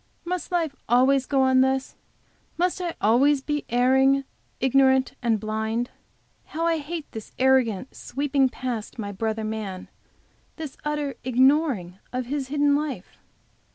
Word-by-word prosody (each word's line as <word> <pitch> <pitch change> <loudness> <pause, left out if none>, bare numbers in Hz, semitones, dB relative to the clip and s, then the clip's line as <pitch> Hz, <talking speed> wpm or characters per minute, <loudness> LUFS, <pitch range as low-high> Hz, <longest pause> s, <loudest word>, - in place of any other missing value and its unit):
Must 360 +1 -3
life 330 -5 0
always 260 +2 +4
go 270 -2 +2
on 260 0 +4
thus? 265 0 0 0.6
Must 360 +1 0
I 345 -2 -3
always 265 +6 +3
be 295 0 -2
erring, 265 +3 +3 0.4
ignorant 265 0 +3
and 225 -2 +1
blind? 220 +3 -2 0.5
How 325 +2 -3
I 330 -1 +2
hate 310 +1 -5
this 220 -1 -9
arrogant 255 -3 +2
sweeping 275 -1 0
past 245 -4 -5
my 205 -3 -4
brother 220 +2 -2
man; 215 -4 -5 0.7
this 310 -4 -7
utter 295 -2 -2
ignoring 255 - +2
of 255 0 -3
his 275 +1 -3
hidden 290 +1 +2
life? 285 -10 -4
265 Hz, 135 wpm, -25 LUFS, 235-290 Hz, 0.7 s, always